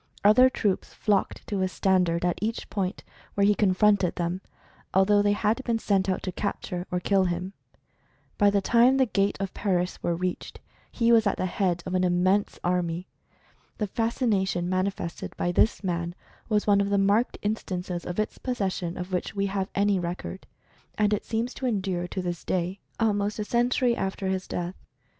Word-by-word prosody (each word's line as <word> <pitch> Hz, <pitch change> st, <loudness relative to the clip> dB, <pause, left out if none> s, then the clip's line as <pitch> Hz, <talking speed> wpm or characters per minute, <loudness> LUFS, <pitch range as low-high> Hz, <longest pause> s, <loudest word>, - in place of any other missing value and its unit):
Other 250 Hz, +6 st, +7 dB
troops 205 Hz, -6 st, -1 dB
flocked 205 Hz, -3 st, 0 dB
to 200 Hz, -, -2 dB
his 185 Hz, 0 st, 0 dB
standard 180 Hz, -3 st, +2 dB
at 175 Hz, -, 0 dB
each 225 Hz, +2 st, -3 dB
point 195 Hz, -2 st, -2 dB, 0.3 s
where 200 Hz, -, +3 dB
he 210 Hz, -, +5 dB
confronted 200 Hz, -1 st, +3 dB
them, 175 Hz, +2 st, -2 dB, 0.5 s
al 190 Hz, 0 st, +6 dB
though 205 Hz, 0 st, +4 dB
they 205 Hz, 0 st, +3 dB
had 215 Hz, +4 st, 0 dB
been 235 Hz, -3 st, 0 dB
sent 195 Hz, -3 st, +1 dB
out 185 Hz, -, -1 dB
to 185 Hz, -, -2 dB
capture 180 Hz, -2 st, -4 dB
or 180 Hz, -, -1 dB
kill 190 Hz, +1 st, +2 dB
him. 180 Hz, +2 st, -2 dB, 0.9 s
By 205 Hz, -, +6 dB
the 200 Hz, 0 st, +2 dB
time 240 Hz, +5 st, +4 dB
the 265 Hz, -, +4 dB
gat4^>f 200 Hz, -3 st, -1 dB
Paris 180 Hz, -2 st, -1 dB
were 170 Hz, -, 0 dB
reached, 180 Hz, +1 st, -4 dB, 0.3 s
he 235 Hz, -1 st, +2 dB
was 225 Hz, -2 st, +5 dB
at 200 Hz, -, 0 dB
the -, -, -1 dB
head 180 Hz, -2 st, 0 dB
of 185 Hz, -, -4 dB
an 185 Hz, 0 st, +2 dB
immense 185 Hz, +3 st, +2 dB
army. 175 Hz, 0 st, -1 dB, 0.7 s
The 210 Hz, -, 0 dB
fascination 205 Hz, -5 st, 0 dB
manifested 185 Hz, -1 st, -3 dB
by 175 Hz, -, 0 dB
this 210 Hz, +4 st, +2 dB
man 170 Hz, -1 st, -2 dB, 0.3 s
was 210 Hz, -2 st, +2 dB
one 200 Hz, -1 st, +4 dB
of 200 Hz, -, 0 dB
the 200 Hz, -, +2 dB
marked 200 Hz, +5 st, +2 dB
in 210 Hz, +1 st, +1 dB
stances 180 Hz, -3 st, -5 dB
of 180 Hz, +3 st, -4 dB
its 215 Hz, -, -2 dB
possession 190 Hz, -8 st, -2 dB
of 180 Hz, +1 st, -6 dB
which 180 Hz, -, -2 dB
we 200 Hz, 0 st, +1 dB
have 195 Hz, -1 st, -1 dB
any 200 Hz, -1 st, +2 dB
record. 180 Hz, +2 st, -5 dB, 0.5 s
And 210 Hz, 0 st, +3 dB
it 210 Hz, -, -1 dB
seems 230 Hz, +2 st, -2 dB
to 260 Hz, -, -3 dB
endure 190 Hz, -6 st, -1 dB
to 185 Hz, +1 st, -4 dB
this 175 Hz, -1 st, -4 dB
day 185 Hz, +2 st, -2 dB
— -, -, -39 dB
almost 210 Hz, -2 st, +1 dB
a 210 Hz, -, -2 dB
century 240 Hz, +1 st, +2 dB
after 190 Hz, -1 st, -2 dB
his 190 Hz, 0 st, -2 dB
death. 175 Hz, +1 st, -3 dB
195 Hz, 190 wpm, -26 LUFS, 180-210 Hz, 0.9 s, Other